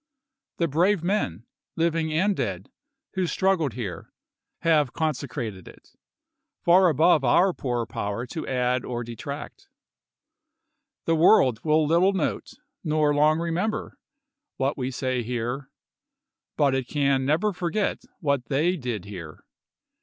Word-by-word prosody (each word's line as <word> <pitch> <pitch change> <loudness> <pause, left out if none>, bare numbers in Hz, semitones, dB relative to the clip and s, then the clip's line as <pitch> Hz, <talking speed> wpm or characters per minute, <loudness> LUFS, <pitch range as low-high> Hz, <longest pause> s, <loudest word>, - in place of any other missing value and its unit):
The 170 - +1
brave 170 +5 +2
men, 120 - -1 0.3
living 165 -1 0
and 190 +6 +2
dead, 95 - -4 0.4
who 185 -2 0
struggled 180 - +1
here, 105 -9 -6 0.5
have 155 -6 +3
consecrated 125 - -3
it, - - -15 0.8
far 180 +1 +6
above 160 0 +4
our 175 +9 +4
poor 120 -5 -2
power 105 +2 -4
to 155 +6 -6
add 125 -1 0
or 120 -1 -4
de 115 0 -8
tract. 145 - -8 1.4
The 165 - +2
world 155 - +5
will 155 0 +3
little 170 +6 +3
note, 185 -6 -2 0.3
nor 155 -2 +2
long 150 +2 +4
remember, 170 +6 -2 0.6
what 135 +2 0
we 130 -1 -3
say 130 -1 -2
here, 125 +3 -3 0.9
but 140 -3 +3
it 130 -2 -1
can 140 -2 +1
never 160 +10 +1
forget 180 +4 -1 0.2
what 140 -5 0
they 160 +9 +1
did 120 - -4
here. 85 -6 -9
145 Hz, 130 wpm, -25 LUFS, 125-170 Hz, 1.4 s, far